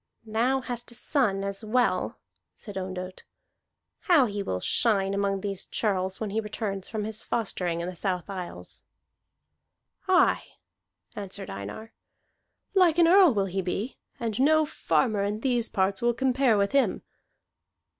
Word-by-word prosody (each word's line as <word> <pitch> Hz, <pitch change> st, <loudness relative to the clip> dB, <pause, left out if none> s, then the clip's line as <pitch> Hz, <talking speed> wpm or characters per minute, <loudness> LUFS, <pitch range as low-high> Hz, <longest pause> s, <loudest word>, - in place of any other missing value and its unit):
"Thou 240 Hz, +5 st, +1 dB
hast 245 Hz, -2 st, -6 dB
a 240 Hz, -, -7 dB
son 220 Hz, -7 st, +1 dB
as 200 Hz, +2 st, -3 dB
well," 245 Hz, +3 st, +1 dB, 0.4 s
said 205 Hz, -3 st, -9 dB
Ondott. 185 Hz, -1 st, -5 dB, 0.8 s
"How 320 Hz, -8 st, +5 dB
he 205 Hz, -3 st, -3 dB
will 90 Hz, -, -2 dB
shine 195 Hz, -, +1 dB
among 200 Hz, -1 st, 0 dB
these 195 Hz, -2 st, -2 dB
churls 190 Hz, -3 st, -1 dB
when 215 Hz, -3 st, -3 dB
he 220 Hz, -, 0 dB
returns 205 Hz, -3 st, -4 dB
from 215 Hz, -2 st, -3 dB
his 220 Hz, +1 st, -5 dB
fostering 180 Hz, -6 st, -2 dB
in 170 Hz, -, -3 dB
the 180 Hz, -, -5 dB
South 180 Hz, -1 st, -2 dB
Isles!" 180 Hz, -, -7 dB, 1.3 s
"Aye," -, -, +3 dB, 0.6 s
answered 200 Hz, -1 st, -6 dB
Einar. 100 Hz, -, -7 dB, 0.8 s
"Like 360 Hz, -4 st, +4 dB
an 340 Hz, -1 st, +6 dB
Earl 370 Hz, -2 st, +7 dB
will 200 Hz, -1 st, +2 dB
he 190 Hz, 0 st, -2 dB
be, 195 Hz, +7 st, -3 dB, 0.2 s
and 225 Hz, -2 st, -2 dB
no 310 Hz, +3 st, +5 dB
farmer 225 Hz, -8 st, +1 dB
of 210 Hz, +2 st, -2 dB
these 245 Hz, -3 st, +1 dB
parts 190 Hz, 0 st, 0 dB
will 240 Hz, 0 st, +2 dB
compare 255 Hz, -2 st, +3 dB
with 200 Hz, 0 st, +1 dB
him." 275 Hz, -1 st, +2 dB
210 Hz, 145 wpm, -27 LUFS, 195-245 Hz, 1.3 s, Earl